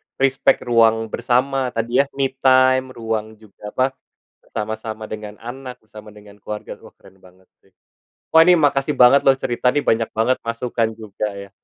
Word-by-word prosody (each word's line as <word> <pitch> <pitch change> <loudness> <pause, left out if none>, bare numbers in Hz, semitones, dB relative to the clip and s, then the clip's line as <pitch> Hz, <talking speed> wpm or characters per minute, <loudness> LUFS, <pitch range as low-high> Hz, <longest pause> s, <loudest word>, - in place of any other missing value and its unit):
respect 135 0 +2
ruang 115 -2 +2
bersama 130 +1 0
tadi 120 +3 0
ya, 140 - +4
me 135 -1 0
time, 130 0 +4
ruang 110 -1 -4
juga, 105 -1 -14
apa, 130 +5 0 0.5
bersama-sama 110 0 -6
dengan 105 -1 -7
anak, 125 +1 -8
bersama 110 0 -14
dengan 105 0 -16
keluarga, 105 +1 -7
wah - - -16
keren 95 - -20
banget! 90 0 -22 0.9
Wah 160 - +9
ini 180 +1 +6
makasih 140 -1 +1
banget 125 +3 +6
loh 135 -1 +5
cerita 125 +1 0
nih 145 - 0
banyak 115 0 +1
banget 115 +4 +1
masukan 115 -1 -2
juga 105 -1 -5
ya. 100 0 -9
115 Hz, 160 wpm, -20 LUFS, 110-130 Hz, 0.9 s, Wah